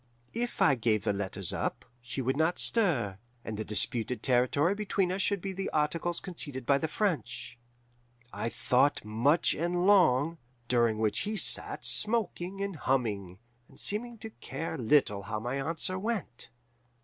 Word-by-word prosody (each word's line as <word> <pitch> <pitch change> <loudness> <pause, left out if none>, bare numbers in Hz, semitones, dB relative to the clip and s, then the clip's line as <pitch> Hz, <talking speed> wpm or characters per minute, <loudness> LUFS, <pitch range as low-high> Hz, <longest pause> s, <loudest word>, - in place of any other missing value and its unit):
If 240 +1 -1
I 145 - +6
gave 110 -4 +1
the - - +1
letters 100 -2 -3
up, - - -3 0.2
she 120 +3 -4
would 130 +2 +1
not 160 +4 +2
stir, 130 - +2 0.3
and 110 - -4
the 110 - -3
disputed 110 +2 +1
territory 135 +7 +3
between 200 -3 0
us 190 +1 -1
should 200 -1 0
be 195 0 -4
by 190 +1 -3
articles 165 +3 0
conceded 145 -8 -5
by 140 +1 +3
the 160 - -1
French. 125 - -2 0.7
"I 115 - -2
thought 125 +3 +2
much 125 +10 +2
and 175 +2 0
long, 165 -5 +4 0.3
during 120 -3 +2
which 110 -1 0
he 210 +2 -2
sat - - -1
smoking 200 -4 0
and 200 -4 -3
humming, 110 -9 -1 0.3
and - - -15
seeming 235 +3 -2
to 220 - -6
care 160 -2 -5
little 120 -6 +2
how 105 +2 -4
my 120 +5 -3
answer 165 +6 -2
went. 200 - -2
145 Hz, 160 wpm, -30 LUFS, 120-185 Hz, 0.7 s, I